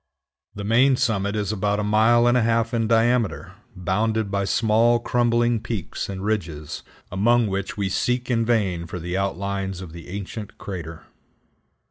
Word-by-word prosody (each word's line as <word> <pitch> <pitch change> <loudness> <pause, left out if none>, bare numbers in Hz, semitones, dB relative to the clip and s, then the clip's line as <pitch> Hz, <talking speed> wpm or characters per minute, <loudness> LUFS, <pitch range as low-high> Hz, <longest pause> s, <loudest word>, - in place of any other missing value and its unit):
The 100 - -5
main 125 +6 +4
summit 105 -5 0
is 105 -1 -1
about 105 0 0
a - - 0
mile 110 +3 +4
and 120 0 +4
a 125 - +4
half 115 +1 +1
in 115 -1 +1
diameter, 115 0 +1 0.2
bounded 105 +4 0
by 100 0 0
small 115 +3 +3
crumbling 120 -1 +1
peaks 110 -5 -4
and 95 0 -5
ridges, 80 -9 -3 0.3
among 115 +6 +3
which 100 0 -3
we 100 -2 0
seek 125 +6 -1
in 115 -1 +2
vain 100 -8 0
for 90 - -6
the 90 +1 -4
outlines 95 -1 -2
of 90 -4 -9
the 85 0 -10
ancient 100 +2 -7
crater. 85 -4 -7
105 Hz, 160 wpm, -23 LUFS, 95-115 Hz, 0.3 s, main